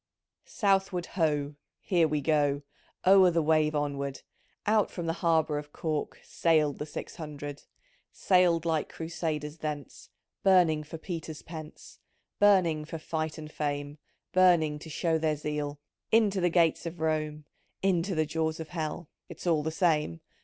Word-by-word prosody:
Southward 195 Hz, -3 st, +1 dB
Ho 150 Hz, -4 st, 0 dB
— -, -, -60 dB
Here 175 Hz, -4 st, +2 dB
we 150 Hz, -1 st, -1 dB
go 145 Hz, -1 st, +1 dB, 0.4 s
I 185 Hz, -, +6 dB
O'er 190 Hz, -2 st, +8 dB
the 165 Hz, -2 st, +1 dB
wave 155 Hz, 0 st, +2 dB
onward 140 Hz, -2 st, -2 dB, 0.4 s
Out 215 Hz, 0 st, +3 dB
from 175 Hz, -, -5 dB
the 165 Hz, -, 0 dB
Harbour 160 Hz, -3 st, +2 dB
of 145 Hz, 0 st, -10 dB
Cork 155 Hz, -2 st, -3 dB
Sailed 155 Hz, -4 st, +1 dB
the 150 Hz, -, -4 dB
Six 150 Hz, -, -7 dB
Hundred! 145 Hz, -2 st, -7 dB, 0.5 s
Sailed 180 Hz, -3 st, +3 dB
like 160 Hz, -2 st, 0 dB
Crusaders 160 Hz, -2 st, -4 dB
thence, 150 Hz, -3 st, -6 dB, 0.3 s
Burning 175 Hz, -5 st, +4 dB
for 155 Hz, +2 st, -8 dB
Peter's 160 Hz, -2 st, -6 dB
pence. 155 Hz, -2 st, -10 dB, 0.2 s
— -, -, -49 dB
Burning 185 Hz, -7 st, +4 dB
for 165 Hz, +2 st, -6 dB
fight 155 Hz, 0 st, -3 dB
and 155 Hz, -1 st, -8 dB
fame 145 Hz, 0 st, -3 dB, 0.2 s
— -, -, -52 dB
Burning 170 Hz, -5 st, +4 dB
to 160 Hz, -, -10 dB
show 160 Hz, +1 st, 0 dB
their 155 Hz, -1 st, +1 dB
zeal 150 Hz, -1 st, -4 dB, 0.2 s
= -, -, -57 dB
3* 225 Hz, -, +7 dB
Into 205 Hz, -4 st, +2 dB
the 175 Hz, -, +3 dB
gates 170 Hz, -1 st, +2 dB
of 170 Hz, 0 st, -7 dB
Rome, 155 Hz, -1 st, -1 dB, 0.4 s
Into 190 Hz, -1 st, +1 dB
the 155 Hz, 0 st, +2 dB
jaws 160 Hz, +1 st, -2 dB
of 160 Hz, -1 st, -6 dB
Hell, 160 Hz, -1 st, -4 dB, 0.2 s
(It's -, -, -10 dB
all 165 Hz, -3 st, +3 dB
the 155 Hz, -, -2 dB
same) 155 Hz, -, +1 dB
160 Hz, 165 wpm, -29 LUFS, 150-170 Hz, 0.5 s, O'er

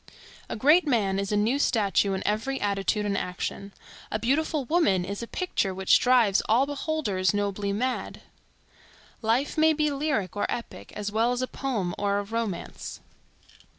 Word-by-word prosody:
A -, -, -3 dB
great 300 Hz, +9 st, +4 dB
man 200 Hz, -7 st, +1 dB
is 200 Hz, 0 st, -2 dB
a 210 Hz, -, +2 dB
new 230 Hz, +7 st, +1 dB
statue 205 Hz, -6 st, +2 dB
in 190 Hz, -, -3 dB
every 225 Hz, +6 st, -1 dB
attitude 205 Hz, +1 st, 0 dB
and 200 Hz, -1 st, 0 dB
action. 195 Hz, +2 st, -4 dB, 0.4 s
A -, -, 0 dB
beautiful 280 Hz, +5 st, 0 dB
woman 240 Hz, -, +2 dB
is 200 Hz, +3 st, -5 dB
a 235 Hz, -, -5 dB
picture 205 Hz, -, -2 dB
which 190 Hz, 0 st, +4 dB
drives 245 Hz, -6 st, +4 dB
all 240 Hz, +5 st, +4 dB
beholders 280 Hz, -10 st, -1 dB
nobly 200 Hz, 0 st, -1 dB
mad. 250 Hz, +5 st, -2 dB, 1.0 s
Life 245 Hz, +7 st, 0 dB
may 315 Hz, 0 st, +5 dB
be 300 Hz, -1 st, +1 dB
lyric 275 Hz, -, -1 dB
or 205 Hz, -, 0 dB
epic, 235 Hz, -, -6 dB
as 205 Hz, 0 st, -3 dB
well 225 Hz, +3 st, +2 dB
as 250 Hz, +1 st, -2 dB
a -, -, -1 dB
poem 220 Hz, -12 st, -2 dB
or 200 Hz, 0 st, +1 dB
a 205 Hz, -, -1 dB
romance. 215 Hz, -4 st, -4 dB
220 Hz, 165 wpm, -26 LUFS, 200-270 Hz, 1.0 s, may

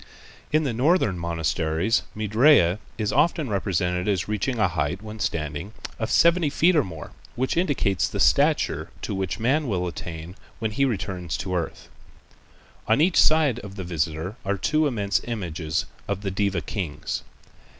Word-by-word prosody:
In 155 Hz, +1 st, +3 dB
the 135 Hz, -5 st, -1 dB
northern 125 Hz, -, +2 dB
monasteries 85 Hz, +3 st, 0 dB, 0.2 s
Maitrêya 110 Hz, -, +4 dB, 0.2 s
is 105 Hz, -2 st, -1 dB
often 160 Hz, -7 st, +2 dB
represented 90 Hz, -2 st, 0 dB
as 95 Hz, -4 st, 0 dB
reaching 105 Hz, +4 st, -1 dB
a 105 Hz, -3 st, +3 dB
height 85 Hz, +3 st, -2 dB
when 110 Hz, 0 st, -8 dB
standing 80 Hz, +3 st, -3 dB, 0.3 s
of 110 Hz, -, -2 dB
seventy 170 Hz, -2 st, +4 dB
feet 170 Hz, +5 st, +3 dB
or 150 Hz, -, +4 dB
more, 80 Hz, -6 st, -8 dB, 0.2 s
which 130 Hz, +2 st, -1 dB
indicates 140 Hz, -, +1 dB
the -, -, -5 dB
stature -, -, +3 dB
to -, -, -3 dB
which 95 Hz, -2 st, -2 dB
man 135 Hz, +6 st, +1 dB
will 90 Hz, -5 st, -1 dB
attain 85 Hz, 0 st, -6 dB, 0.2 s
when 110 Hz, -2 st, -2 dB
he 135 Hz, +6 st, +2 dB
returns 90 Hz, -, -2 dB
to 95 Hz, -1 st, -4 dB
earth. 85 Hz, -3 st, -3 dB, 1.0 s
On 110 Hz, -, +3 dB
each 170 Hz, +3 st, +5 dB
side 155 Hz, -6 st, +4 dB
of 100 Hz, -4 st, -9 dB
the 95 Hz, -, -5 dB
visitor 85 Hz, +3 st, -2 dB
are 100 Hz, +1 st, -1 dB
two 155 Hz, +8 st, +2 dB
immense 100 Hz, -7 st, 0 dB
images 85 Hz, -8 st, -2 dB, 0.2 s
of 100 Hz, -1 st, -2 dB
the 100 Hz, -2 st, -2 dB
Deva 100 Hz, -2 st, 0 dB
kings. 80 Hz, -1 st, -4 dB
100 Hz, 160 wpm, -25 LUFS, 90-120 Hz, 1.0 s, each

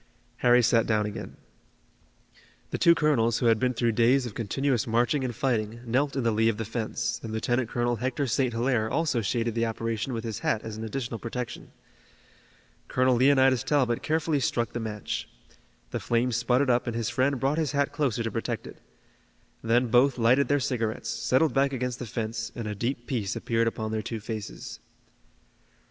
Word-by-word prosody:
Harry 125 Hz, 0 st, +4 dB
sat 115 Hz, 0 st, +3 dB
down 105 Hz, -2 st, +2 dB
again. 105 Hz, -, -7 dB, 1.3 s
The -, -, -2 dB
two 170 Hz, 0 st, +6 dB
colonels, 120 Hz, -8 st, +2 dB
who 125 Hz, -, -1 dB
had 115 Hz, -2 st, +4 dB
been 125 Hz, 0 st, 0 dB
through 115 Hz, 0 st, +1 dB
days 120 Hz, +4 st, +3 dB
of 120 Hz, -, -6 dB
continuous 125 Hz, +3 st, -1 dB
marching 120 Hz, +5 st, +1 dB
and 125 Hz, -3 st, -3 dB
fighting, 115 Hz, -3 st, -1 dB
knelt 135 Hz, +5 st, 0 dB
in 135 Hz, -, 0 dB
the 115 Hz, -, +2 dB
lee 110 Hz, +1 st, +3 dB
of 110 Hz, -, -1 dB
the 110 Hz, -, -3 dB
fence, 115 Hz, +1 st, -3 dB
and 115 Hz, -, -6 dB
Lieutenant 120 Hz, +2 st, 0 dB
Colonel 120 Hz, 0 st, 0 dB
Hector 130 Hz, +4 st, -1 dB
St. 130 Hz, +1 st, +1 dB
Hilaire 115 Hz, -1 st, 0 dB
also 150 Hz, -6 st, 0 dB
shaded 115 Hz, +2 st, -1 dB
the 115 Hz, 0 st, 0 dB
operation 115 Hz, +2 st, -3 dB
with 115 Hz, -1 st, -3 dB
his 110 Hz, -3 st, -4 dB
hat 110 Hz, -, 0 dB
as 110 Hz, -1 st, -6 dB
an 110 Hz, -, -6 dB
additional 115 Hz, 0 st, -4 dB
protection. 120 Hz, 0 st, -6 dB, 1.2 s
Colonel 130 Hz, 0 st, +2 dB
Leonidas 130 Hz, -1 st, +4 dB
Talbot 130 Hz, -6 st, +1 dB
carefully 155 Hz, -1 st, 0 dB
struck 120 Hz, -3 st, -1 dB
the 120 Hz, -, -2 dB
match. 105 Hz, -3 st, -4 dB, 0.6 s
The -, -, -2 dB
flame 120 Hz, +2 st, 0 dB
sputtered 125 Hz, +3 st, +2 dB
up 120 Hz, 0 st, +1 dB
and 120 Hz, -, -2 dB
his 115 Hz, -2 st, -1 dB
friend 135 Hz, +1 st, +1 dB
brought 140 Hz, +5 st, +1 dB
his 150 Hz, -3 st, -1 dB
hat 140 Hz, 0 st, +1 dB
closer 135 Hz, -6 st, -1 dB
to 115 Hz, -, -2 dB
protect -, -, -3 dB
it. -, -, -12 dB, 0.8 s
Then 120 Hz, +2 st, +2 dB
both 125 Hz, +3 st, +4 dB
lighted 125 Hz, +4 st, +4 dB
their 145 Hz, 0 st, +2 dB
cigarettes, 110 Hz, -4 st, -2 dB
settled 135 Hz, +7 st, +1 dB
back 140 Hz, 0 st, +2 dB
against 125 Hz, -1 st, -3 dB
the 125 Hz, -, -5 dB
fence, 110 Hz, 0 st, -4 dB
and 115 Hz, -3 st, -4 dB
a 105 Hz, -, -2 dB
deep 120 Hz, +4 st, -3 dB
peace 110 Hz, -7 st, -2 dB
appeared 115 Hz, 0 st, 0 dB
upon 110 Hz, -1 st, -3 dB
their 110 Hz, 0 st, -1 dB
two 110 Hz, +2 st, -5 dB
faces. 110 Hz, -1 st, -7 dB
120 Hz, 190 wpm, -27 LUFS, 115-130 Hz, 1.3 s, two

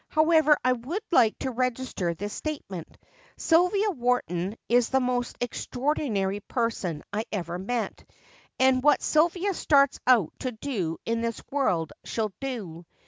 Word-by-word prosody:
However, 310 Hz, -1 st, +4 dB
I 255 Hz, -, +5 dB
would 270 Hz, -, -4 dB
like 235 Hz, -9 st, +4 dB
to 265 Hz, -, -3 dB
register 250 Hz, -8 st, -2 dB
this 205 Hz, +5 st, -5 dB
statement 200 Hz, -, -6 dB, 0.4 s
Sylvia 360 Hz, +5 st, +3 dB
Wharton 225 Hz, -, -1 dB
is 240 Hz, 0 st, +3 dB
the 265 Hz, -, +3 dB
most 250 Hz, -1 st, -1 dB
extraordinary 245 Hz, -5 st, -1 dB
person 205 Hz, -, -2 dB
I 215 Hz, +2 st, -1 dB
ever 180 Hz, -3 st, -3 dB
met. 230 Hz, +5 st, -3 dB, 0.6 s
And 260 Hz, -1 st, +4 dB
what 295 Hz, +2 st, +4 dB
Sylvia 345 Hz, +5 st, +2 dB
starts 280 Hz, -5 st, +3 dB
out 235 Hz, -10 st, +4 dB
to 255 Hz, -1 st, -3 dB
do 215 Hz, -, -3 dB
in 230 Hz, 0 st, -1 dB
this 230 Hz, -1 st, -3 dB
world 185 Hz, -, 0 dB
she'll 215 Hz, -3 st, -2 dB
do. 195 Hz, -11 st, -6 dB
245 Hz, 140 wpm, -27 LUFS, 205-280 Hz, 0.6 s, I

